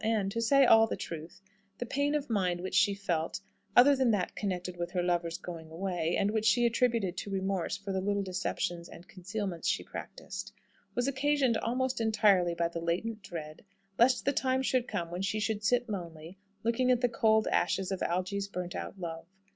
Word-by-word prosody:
And 215 -3 +1
to 230 - -2
say 275 +4 +5
all 225 -2 +7
the - - -2
truth 165 +4 -8 0.3
the 245 - -3
pain 285 +4 0
of 295 -2 -1
mind 185 -6 0
which 185 - -5
she 200 0 +4
felt, 175 -5 -2 0.4
other 275 +3 +8
than 260 -2 +2
that 205 -5 0
connected 180 -3 -3
with 175 0 -3
her 180 -2 0
lover's 175 -1 0
going 165 -3 -8
away, 175 0 -2
and 200 - +1
which 220 0 +1
she 240 +3 +4
attributed 230 -5 +1
to - - -4
remorse 190 -1 -1
for 200 0 -6
the 190 0 -1
little 200 +1 0
deceptions 180 -2 -3
and 175 - -13
concealments 190 -1 -4
she - - +1
practised, - - -7 0.4
was 245 +1 +1
occasioned 275 -2 +2
almost 250 +2 -1
entirely 205 -6 +3
by 170 0 +1
the 170 0 -5
latent 210 +7 -2
dread, 155 -4 -8 0.4
lest 250 +2 +4
the 280 - +2
time 260 0 +1
should 255 -2 +1
come 170 -1 -3
when 175 +1 -4
she 205 +2 -1
should 215 -1 -1
sit 245 +4 +2
lonely, 170 -3 -7 0.2
looking 235 +3 +1
at 250 -1 +3
the 245 - +4
cold 220 -2 +3
ashes 195 0 +1
of 190 - -3
Algy's 185 +3 -1
burnt 180 -2 -5
out 195 - -6
love. 165 -1 -6
200 Hz, 195 wpm, -31 LUFS, 175-230 Hz, 0.4 s, other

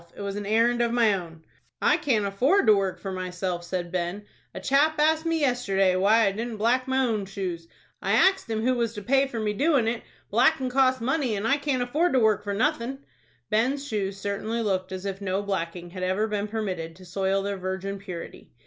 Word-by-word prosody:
It - - -9
was 200 0 -4
an 205 -1 -4
errand 235 +3 +3
of 235 -1 +1
my 230 -3 +3
own." 165 -4 -6 0.4
"I - - +4
can't 225 -8 +1
afford 255 - +2
to 215 - +7
work 195 -2 -1
for 195 - -5
myself," 180 -1 -3
said 175 -1 -4
Ben. 185 +3 -3 0.3
"A - - -7
chap 290 +3 +3
asked 315 +2 +2
me, 330 -1 0
yesterday, 195 -8 +2
why 215 +4 +4
I 195 - +2
didn't 225 +2 -4
black 245 +4 +1
my 260 0 +2
own 215 -5 -1
shoes. 180 -4 -5 0.3
I - - 0
axed 385 -9 +3
him 220 -1 -1
who 255 +2 +3
was 235 -2 -1
to 205 - -6
pay 270 +4 +3
me - - -8
for 215 -4 -2
doin' 275 -1 +2
it. 230 0 -1 0.3
Blackin' 255 +3 +3
costs 260 -1 +3
money, 260 -2 0
and 205 +2 -2
I 275 - +3
can't 280 -4 0
afford 305 +8 +1
to 260 - +4
work 215 -3 +3
for 200 -1 -3
nothin'." 270 +2 -1 0.5
Ben's 265 +6 +1
shoes 200 -5 -2
certainly 210 +4 -2
looked 190 -3 -1
as 185 +1 -6
if 195 0 -4
no 195 0 -1
blacking 175 -3 -4
had 185 0 -7
ever 190 +4 +1
been 210 -1 -2
permitted 185 -7 -4
to 185 +1 -14
soil 195 +2 0
their 200 0 -3
virgin 190 +1 -4
purity. 180 -4 -8
210 Hz, 215 wpm, -26 LUFS, 195-250 Hz, 0.5 s, to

